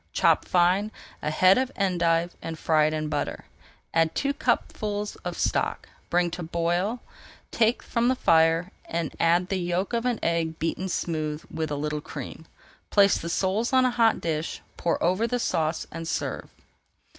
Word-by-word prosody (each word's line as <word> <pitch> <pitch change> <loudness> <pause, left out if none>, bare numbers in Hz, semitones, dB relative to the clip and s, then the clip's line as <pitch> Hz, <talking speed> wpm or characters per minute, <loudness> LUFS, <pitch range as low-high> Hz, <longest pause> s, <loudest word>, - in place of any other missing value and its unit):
Chop - - +3
fine 185 +4 +2 0.3
a 150 - -1
head 185 +7 +5
of 260 0 -1
endive 175 -3 +1
and 165 -1 -5
fry 155 -1 +3
it 155 - -1
in 155 0 -2
butter. 150 - -3 0.5
Add 165 -1 +2
two 280 0 0
cupfuls 210 -6 -1
of - - -6
stock, - - -1 0.2
bring 175 0 +2
to 180 - -5
the 165 - -6
boil, 175 +7 -1 0.5
take 230 +1 +2
from 235 0 0
the 260 - +3
fire, 165 -2 +3
and 165 -1 -3
add 175 +2 +3
the 195 - 0
yolk 175 +4 -1
of 235 +1 0
an 245 -2 +1
egg 165 -1 0
beaten 185 +3 -2
smooth 155 -3 -2
with 160 -1 -3
a 145 - -2
little 150 +1 -2
cream. 160 +2 -8 0.4
Place 200 -2 +4
the 170 - -5
soles 200 +8 0
on 260 0 +5
a 255 - +2
hot 230 -2 +3
dish, 160 -1 -3
pour 170 - 0
over 185 +7 +2
the 245 - 0
sauce, 165 -8 -1
and 165 0 -6
serve. - - -3
175 Hz, 175 wpm, -26 LUFS, 165-205 Hz, 0.5 s, head